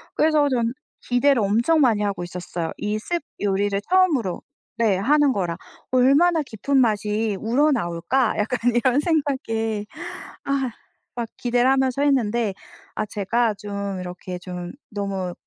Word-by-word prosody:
그래서 305 Hz, -2 st, +3 dB
저는 235 Hz, -2 st, 0 dB, 0.3 s
기대를 245 Hz, 0 st, +3 dB
엄청 235 Hz, +11 st, +2 dB
많이 225 Hz, -5 st, +3 dB
하고 200 Hz, -3 st, -1 dB
있었어요. 175 Hz, -1 st, -5 dB
이 210 Hz, +1 st, -2 dB
soup 335 Hz, +9 st, -3 dB, 0.2 s
요리를 200 Hz, 0 st, 0 dB
처음으로 320 Hz, -, +2 dB, 0.4 s
네 220 Hz, -5 st, +2 dB
하는 285 Hz, +7 st, +3 dB
거라 175 Hz, -4 st, -1 dB, 0.4 s
'얼마나 290 Hz, +7 st, +4 dB
깊은 270 Hz, +2 st, -1 dB
맛이 215 Hz, -3 st, +1 dB
우러나올까?' 235 Hz, -, +1 dB
약간 225 Hz, +4 st, 0 dB, 0.2 s
이런 250 Hz, +3 st, +3 dB
생각에 225 Hz, -9 st, -1 dB, 0.6 s
아 270 Hz, -3 st, 0 dB, 0.4 s
막 235 Hz, -2 st, -3 dB
기대를 245 Hz, +1 st, +2 dB
하면서 265 Hz, 0 st, +2 dB
했는데 235 Hz, -6 st, +1 dB, 0.4 s
아 -, -, -1 dB
제가 215 Hz, +3 st, 0 dB
좀 200 Hz, -1 st, -5 dB
이렇게 180 Hz, 0 st, -6 dB
좀 180 Hz, -1 st, -6 dB, 0.2 s
너무 195 Hz, -4 st, -3 dB
230 Hz, 290 characters per minute, -23 LUFS, 200-270 Hz, 0.6 s, 얼마나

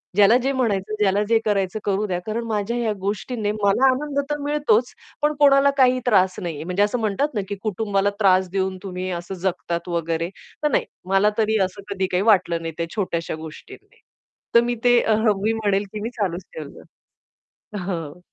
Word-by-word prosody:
ज्याला 205 Hz, +4 st, +6 dB
जे 270 Hz, -, +1 dB
म्हणायचं, 215 Hz, -6 st, -1 dB
ज्याला 205 Hz, 0 st, +2 dB
जे 230 Hz, -, +5 dB
करायचं, 200 Hz, 0 st, 0 dB
करू 200 Hz, +1 st, 0 dB
द्या. 180 Hz, -1 st, -1 dB
कारण 225 Hz, +2 st, -2 dB
माझ्या 220 Hz, +2 st, -1 dB
ह्या 230 Hz, -3 st, 0 dB
गोष्टीने 210 Hz, +2 st, -2 dB
मला 210 Hz, +4 st, +2 dB
आनंद 280 Hz, +2 st, -1 dB
तर 295 Hz, -, -1 dB
मिळतोच. 285 Hz, -5 st, +1 dB, 0.3 s
पण 300 Hz, +1 st, +2 dB
कोणाला 280 Hz, -1 st, +6 dB
काही 255 Hz, -1 st, +4 dB
त्रास 190 Hz, -5 st, +3 dB
नाहीये 160 Hz, -4 st, -4 dB
म्हणजे 180 Hz, +4 st, +1 dB
असं 220 Hz, +4 st, 0 dB
म्हणतात 220 Hz, +6 st, 0 dB
ना, 205 Hz, -, +1 dB
की 200 Hz, -, -2 dB
कुटुंबाला 205 Hz, -1 st, 0 dB
त्रास 185 Hz, -2 st, +4 dB
देऊन 190 Hz, 0 st, -1 dB
तुम्ही 185 Hz, -1 st, -4 dB
असं 175 Hz, +2 st, -8 dB
जगतात 175 Hz, -1 st, -3 dB
वगैरे. 170 Hz, 0 st, -1 dB, 0.3 s
तर 300 Hz, -, +2 dB
नाही -, -, +2 dB, 0.2 s
मला 195 Hz, +2 st, +4 dB
तरी 220 Hz, 0 st, +2 dB
असं 190 Hz, +2 st, -8 dB
कधी 190 Hz, -1 st, -1 dB
काही 180 Hz, +2 st, +1 dB
वाटलं 185 Hz, -6 st, +3 dB
नाही 165 Hz, -1 st, -5 dB
त्या 170 Hz, -, -1 dB
छोट्याश्या 170 Hz, -6 st, -2 dB
गोष्टींनी. 155 Hz, -1 st, -12 dB, 0.5 s
तर 235 Hz, -, +8 dB
मी 240 Hz, 0 st, -1 dB
ते 245 Hz, -1 st, +5 dB
अह, 220 Hz, 0 st, +2 dB
मी 225 Hz, -, +2 dB
म्हणेल 205 Hz, -3 st, 0 dB
की 210 Hz, -, -4 dB
मी 230 Hz, -, -3 dB
चालूच 190 Hz, -6 st, -3 dB
ठेवलं. 150 Hz, -3 st, -9 dB, 0.9 s
अ, -, -, -3 dB
हं. 175 Hz, -4 st, -5 dB
205 Hz, 185 wpm, -22 LUFS, 185-225 Hz, 0.9 s, तर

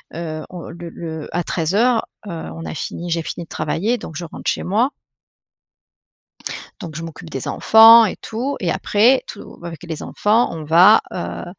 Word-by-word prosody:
heu, 155 Hz, -2 st, -5 dB
on 180 Hz, -2 st, -8 dB
le 170 Hz, 0 st, -8 dB
le 160 Hz, -2 st, -7 dB
à 175 Hz, -, 0 dB
13:00, 210 Hz, +10 st, +1 dB, 0.2 s
heu, -, -, -5 dB
on 80 Hz, -, -7 dB
a 80 Hz, -, -5 dB
fini 175 Hz, +1 st, -5 dB
j'ai 165 Hz, 0 st, 0 dB
fini 170 Hz, -, -6 dB
de -, -, -37 dB
travailler 225 Hz, +8 st, -1 dB
donc 160 Hz, -, -9 dB
je 170 Hz, +1 st, -5 dB
rentre -, -, -5 dB
chez -, -, -2 dB
moi. 225 Hz, +8 st, +1 dB, 1.9 s
Donc, 160 Hz, -4 st, -8 dB
je 165 Hz, -, -5 dB
m'occupe 165 Hz, 0 st, -9 dB
des 135 Hz, -4 st, -5 dB
enfants 225 Hz, +1 st, +8 dB
et 195 Hz, -, -2 dB
tout 255 Hz, +6 st, -4 dB
et 175 Hz, -, -1 dB
après, 215 Hz, +6 st, +3 dB
tout 205 Hz, -, -10 dB
bah, 170 Hz, -, -7 dB
avec 165 Hz, +1 st, -9 dB
les 165 Hz, -3 st, -6 dB
enfants 215 Hz, -1 st, +1 dB
on 160 Hz, -1 st, -6 dB
va, 180 Hz, +8 st, +7 dB
heu, 85 Hz, 0 st, -5 dB
170 Hz, 185 wpm, -20 LUFS, 160-215 Hz, 1.9 s, enfants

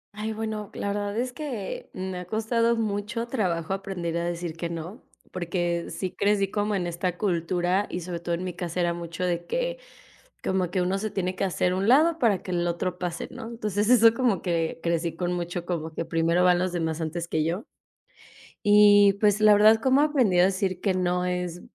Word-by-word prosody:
Ay, 215 Hz, +1 st, -3 dB
bueno, 215 Hz, -1 st, -4 dB
la 200 Hz, -, -3 dB
verdad 205 Hz, +1 st, -2 dB
es 250 Hz, +1 st, -2 dB
que 250 Hz, -10 st, -5 dB
me 185 Hz, -1 st, -4 dB
ha 180 Hz, -, -7 dB
costado 230 Hz, +3 st, +1 dB
mucho 220 Hz, +2 st, -2 dB
trabajo 185 Hz, -8 st, -1 dB
aprender 190 Hz, -4 st, -4 dB
a 170 Hz, -, -1 dB
decir 175 Hz, -1 st, -4 dB
que 170 Hz, 0 st, -4 dB
no, 170 Hz, -, -7 dB, 0.3 s
porque, 175 Hz, -1 st, -2 dB
sí 185 Hz, -2 st, -4 dB
crecí 200 Hz, -1 st, +1 dB
como 205 Hz, 0 st, 0 dB
en 180 Hz, -, -1 dB
esta 175 Hz, +1 st, -2 dB
cultura 180 Hz, +1 st, 0 dB
y 180 Hz, -, -4 dB
sobre 170 Hz, 0 st, -5 dB
todo 170 Hz, 0 st, -2 dB
en 180 Hz, -, -5 dB
mi 180 Hz, -1 st, -4 dB
casa 175 Hz, 0 st, -4 dB
era 175 Hz, -1 st, +1 dB
mucho 170 Hz, +1 st, -6 dB
de 175 Hz, -1 st, -2 dB
que -, -, -2 dB, 0.6 s
como 185 Hz, -2 st, -1 dB
que 185 Hz, 0 st, 0 dB
uno 190 Hz, +2 st, 0 dB
se 215 Hz, 0 st, -3 dB
tiene 185 Hz, -2 st, -2 dB
que -, -, -2 dB
hacer 180 Hz, -1 st, 0 dB
a -, -, -1 dB
un 195 Hz, +3 st, 0 dB
lado 315 Hz, +6 st, +5 dB
para 220 Hz, -, +2 dB
que 185 Hz, -, -6 dB
el 175 Hz, 0 st, 0 dB
otro 175 Hz, +1 st, -2 dB
pase, 175 Hz, -2 st, -4 dB
¿no? -, -, -8 dB
Entonces 210 Hz, -2 st, -1 dB
eso 230 Hz, -2 st, +7 dB
como 235 Hz, -6 st, +1 dB
que 165 Hz, -2 st, -1 dB
crecí 170 Hz, 0 st, -1 dB
con 180 Hz, -1 st, -1 dB
mucho, 175 Hz, 0 st, -4 dB
como 165 Hz, -3 st, -3 dB
que 165 Hz, -, -3 dB
primero 165 Hz, +2 st, +2 dB
van 180 Hz, -1 st, +4 dB
los 185 Hz, 0 st, 0 dB
demás 165 Hz, -2 st, -2 dB
antes 165 Hz, +2 st, -3 dB
que 160 Hz, -2 st, 0 dB
yo 170 Hz, +7 st, -2 dB, 1.0 s
y 205 Hz, -1 st, +7 dB
pues, 210 Hz, 0 st, +3 dB
la 215 Hz, 0 st, +7 dB
verdad, 215 Hz, +2 st, +6 dB
¿cómo 260 Hz, +2 st, +3 dB
aprendí 260 Hz, -12 st, +3 dB
a 180 Hz, -, +7 dB
decir 185 Hz, -1 st, -1 dB
que 195 Hz, -1 st, +1 dB
no?, 180 Hz, 0 st, 0 dB
es, 180 Hz, -1 st, -3 dB
185 Hz, 210 wpm, -26 LUFS, 175-210 Hz, 1.0 s, eso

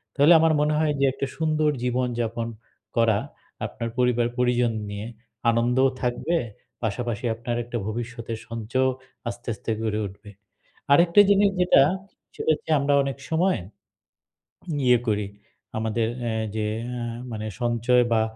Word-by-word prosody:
তাহলে 145 Hz, +4 st, +7 dB
আমার 160 Hz, 0 st, +4 dB
মনে 150 Hz, +1 st, +2 dB
হয় 155 Hz, -1 st, +2 dB
যে 140 Hz, -, +4 dB
একটা 140 Hz, -, -3 dB
সুন্দর 155 Hz, -1 st, +2 dB
জীবনযাপন 120 Hz, -2 st, -1 dB, 0.5 s
করা 115 Hz, -3 st, +4 dB, 0.5 s
আপনার 115 Hz, -, -4 dB
পরিবার 125 Hz, -1 st, +2 dB
পরিজন 125 Hz, -1 st, +2 dB, 0.2 s
নিয়ে। 100 Hz, +2 st, -5 dB, 0.4 s
আনন্দও 120 Hz, +3 st, +3 dB
থাকবে, 125 Hz, +7 st, 0 dB, 0.5 s
পাশাপাশি 115 Hz, +1 st, -2 dB
আপনার 120 Hz, +1 st, -3 dB
একটা 120 Hz, 0 st, -4 dB
ভবিষ্যতের 115 Hz, 0 st, -4 dB
সঞ্চয়ও 120 Hz, +3 st, 0 dB, 0.4 s
আস্তে, 120 Hz, +1 st, -9 dB
আস্তে 110 Hz, -, -5 dB
গড়ে 110 Hz, -1 st, -1 dB
উঠবে। 100 Hz, +2 st, -13 dB, 0.6 s
আরেকটা 170 Hz, +6 st, +6 dB
জিনিস 200 Hz, 0 st, +5 dB
যেটা, 180 Hz, -, +6 dB, 0.5 s
সেটা -, -, -2 dB
হচ্ছে 160 Hz, -, -5 dB
আমরা 140 Hz, +1 st, +2 dB
অনেক 135 Hz, -2 st, -3 dB
সময় 175 Hz, +4 st, +2 dB, 1.3 s
ইয়ে 125 Hz, -1 st, +6 dB
করি। 105 Hz, -1 st, +1 dB, 0.5 s
আমাদের 110 Hz, +1 st, 0 dB, 0.2 s
অ্যা 115 Hz, -2 st, -1 dB, 0.2 s
যে 110 Hz, -1 st, 0 dB, 0.2 s
অ্যা 125 Hz, -1 st, -4 dB, 0.3 s
মানে 110 Hz, -1 st, -4 dB, 0.2 s
সঞ্চয় 120 Hz, +1 st, +3 dB
বা, 110 Hz, -1 st, +4 dB
120 Hz, 135 wpm, -25 LUFS, 115-140 Hz, 1.3 s, তাহলে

